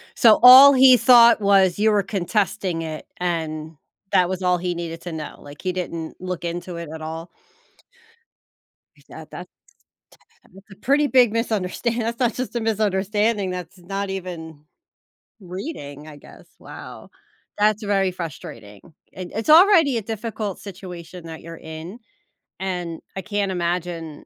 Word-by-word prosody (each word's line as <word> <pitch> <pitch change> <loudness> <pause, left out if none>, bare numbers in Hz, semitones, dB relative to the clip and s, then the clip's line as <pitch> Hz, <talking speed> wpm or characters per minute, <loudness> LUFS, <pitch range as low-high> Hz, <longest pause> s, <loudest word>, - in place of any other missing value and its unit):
So, 225 -4 +5
all 265 +3 +10
he 260 -1 +7
thought 235 -3 +6
was 195 -2 +3
you 215 +1 +3
were 205 -1 +2
contesting 195 -2 -2
it, 155 -1 -7
and 160 -3 -4 0.3
that 180 -1 +3
was 185 0 -4
all 180 0 +2
he 175 0 -3
needed 165 -1 -6
to 175 - -7
know, 155 -2 -7
like, 145 0 -13
he 185 - -1
didn't 170 -3 -5
look 180 -1 -5
into 175 +1 -5
it 170 -2 -7
at 160 - -8
all? 160 +2 -7 1.6
Tha - - -24
that - - -12
that's - - -9 1.2
a - - -12
pretty 280 +8 +1
big 250 -5 +4
misunderstand 230 +1 -2
that's 230 +2 -3
not 240 -3 +1
just 255 -1 -5
a - - 0
misunderstanding, 210 -1 0
that's 180 0 -7
not 195 +3 -5
even 165 -5 -7 0.8
reading, 175 - -8
I 150 - -11
guess, 145 - -16
wow - - -11 0.5
that's 210 +1 +1
very 195 -2 +1
frustrating, 115 - -9 0.3
and 185 -1 -8
it's 225 +7 -2
already 325 - +6
a 225 - -2
difficult 215 -2 -5
situation 180 -3 -10
that 160 -1 -9
you're 165 0 -10
in, 160 +9 -10 0.6
and 180 -3 -4 0.2
I 190 - -4
can't 205 -1 -2
imagine, 170 -3 -4
185 Hz, 150 wpm, -22 LUFS, 170-215 Hz, 1.6 s, all